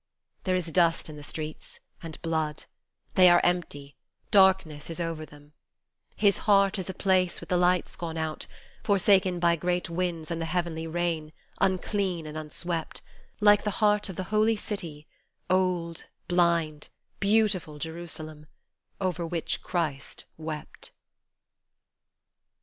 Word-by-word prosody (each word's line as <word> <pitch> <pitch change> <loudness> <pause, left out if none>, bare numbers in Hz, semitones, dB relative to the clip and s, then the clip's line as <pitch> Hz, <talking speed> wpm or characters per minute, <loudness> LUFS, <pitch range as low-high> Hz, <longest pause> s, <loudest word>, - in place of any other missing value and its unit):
There 185 -1 +2
is 170 -3 -1
dust 170 -2 +2
in 155 - -8
the 150 - -9
streets, 155 +1 -6 0.2
and 165 -2 -8
blood; 160 -3 -1 0.5
they 185 -1 +7
are 175 0 +7
empty; 145 -5 -1 0.3
darkness 190 -7 +4
is 165 - -4
over 165 -2 -3
them; 145 0 -17 0.6
His 200 -2 +3
heart 195 -1 +4
is 190 - -4
a - - -3
place 185 -2 +2
with - - -11
the 180 - +2
lights 180 +1 +2
gone 165 -3 -5
out, 160 -1 -3 0.4
forsaken 190 -2 +3
by 170 0 +4
great 175 +1 -1
winds 170 -2 -2
and 165 0 -2
the 165 - -2
heavenly 165 -1 -2
rain, 165 -2 -2 0.3
unclean 190 -2 0
and 155 0 -7
unswept, 160 +2 -3 0.4
Like 205 0 +6
the 210 - 0
heart 210 -1 +3
of 190 - -6
the 185 - -3
holy 215 +1 +4
city, 170 -8 -4 0.5
old, 180 -3 0 0.2
blind, 170 -4 +1 0.3
beautiful 200 -7 +2
Jerusalem, 160 -1 -5 0.5
Over 180 -3 -1
which 165 -1 -1
Christ 155 -6 -3
wept. 155 -1 -7
170 Hz, 135 wpm, -27 LUFS, 160-185 Hz, 0.6 s, they